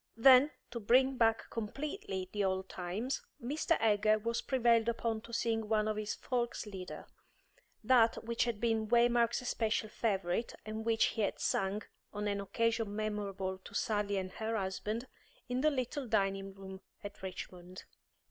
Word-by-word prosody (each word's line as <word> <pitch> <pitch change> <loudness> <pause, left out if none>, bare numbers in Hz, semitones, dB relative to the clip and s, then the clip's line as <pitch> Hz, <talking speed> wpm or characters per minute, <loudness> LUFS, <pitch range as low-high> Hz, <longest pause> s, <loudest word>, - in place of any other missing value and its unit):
Then, 260 +4 +8 0.2
to 240 - -4
bring 260 +5 +4
back 225 -2 +2
completely 230 - -4
the 205 -1 -1
old 190 0 0
times, 190 +10 -3 0.2
Mr. 300 +6 0
Egger 215 0 +4
was 230 +2 -2
prevailed 235 -3 +3
upon 230 -1 -1
to 235 - -12
sing 225 -2 0
one 215 -1 +2
of 215 - 0
his 215 0 -2
Volkslieder, 220 -7 -4 0.8
that 235 -3 +4
which 235 +1 0
had 235 -3 -2
been 225 -1 +1
Waymark's 235 +1 +3
especial 220 -3 0
favourite, 200 -1 -1
and 220 +1 -5
which 225 -1 +3
he 225 - -2
had 205 - 0
sung 195 +2 0 0.3
on 210 0 -3
an 200 -1 -1
occasion 225 0 0
memorable 200 -3 -3
to 200 - -12
Sally 205 -1 0
and 185 -1 -3
her 220 +3 -2
husband 210 +4 -2 0.4
in 250 +1 -1
the 310 - +5
little 260 -1 -2
dining 195 -3 0
room 190 0 -9 0.2
at 205 0 -8
Richmond. 185 -1 -7
220 Hz, 155 wpm, -33 LUFS, 200-235 Hz, 0.8 s, Then